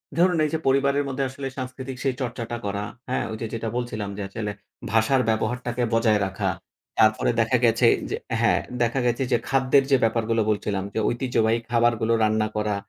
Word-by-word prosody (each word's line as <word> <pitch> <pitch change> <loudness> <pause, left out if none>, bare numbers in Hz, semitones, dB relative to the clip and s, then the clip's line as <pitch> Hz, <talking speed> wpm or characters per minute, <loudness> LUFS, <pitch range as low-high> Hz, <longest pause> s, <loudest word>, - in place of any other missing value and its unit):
ধরুন 175 0 +3
এই - - -1
যে 160 - 0
পরিবারের 140 +1 +3
মধ্যে 135 0 -2
আসলে 135 +1 -6
সাংস্কৃতিক 130 0 -6
সেই 135 -2 0
চর্চাটা 120 -1 -4
করা, 100 0 -2 0.3
হ্যাঁ? 130 - 0
ওই 110 - -4
যে 115 - -1
যেটা 115 0 -3
বলছিলাম 110 -4 -3
যে - - -4
আসলে 105 +1 -4 0.4
ভাষার 115 +4 +3
ব্যবহারটাকে 120 +2 -1
বজায় 115 -2 +3
রাখা। 95 0 -2 0.5
তারপরে 110 +1 +4
দেখা 115 +3 +3
গেছে 115 +1 +4 0.2
যে - - -1 0.3
হ্যাঁ - - +3 0.2
দেখা 120 +3 +1
গেছে 120 +2 +1
যে - - +5
খাদ্যের 135 +1 +3
যে 135 - +6
ব্যাপারগুলো 115 0 +1
বলছিলাম। 100 -2 -1
যে - - -1
ঐতিহ্যবাহী 120 -2 +1
খাবারগুলো 115 -1 +2
রান্না 110 0 +2
করা 105 -1 0
115 Hz, 175 wpm, -24 LUFS, 110-130 Hz, 0.5 s, যে